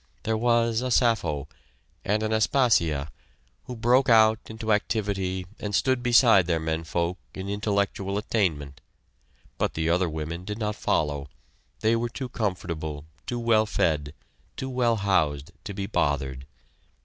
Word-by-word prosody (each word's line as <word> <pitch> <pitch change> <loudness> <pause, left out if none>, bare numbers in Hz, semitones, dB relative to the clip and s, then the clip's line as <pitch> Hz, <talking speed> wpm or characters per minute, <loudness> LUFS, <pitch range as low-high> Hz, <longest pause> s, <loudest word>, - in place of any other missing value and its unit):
There 110 - 0
was 115 0 +2
a 130 - -2
Sappho, 90 - +1 0.6
and 105 +2 0
an 110 0 0
Aspasia, 100 - +2 0.5
who 125 - -6
broke 125 +4 +3
out 110 -1 +6
into 110 -1 -1
activity 95 -3 -1
and 105 -1 -3
stood 130 +2 +2
beside 115 -6 +5
their 85 -2 +1
men 80 +1 -2
folk 85 +2 -2 0.2
in 95 0 -5
intellectual 100 -1 -1
attainment, 80 -10 -1 0.8
but - - 0
the 80 +1 0
other 90 0 +2
women 80 +2 -5
did 105 +2 -5
not 105 -2 -2
follow; 75 -6 -1 0.5
they 110 +1 +3
were 120 +1 -1
too 130 +2 -6
comfortable, 85 -9 -3 0.2
too 120 - -2
well 115 -2 +3
fed, 75 -6 0 0.4
too 130 0 -4
well 120 -2 +2
housed, 85 -7 0
to 105 - -5
be 100 - -3
bothered. 70 -8 -1
100 Hz, 145 wpm, -26 LUFS, 80-115 Hz, 0.8 s, out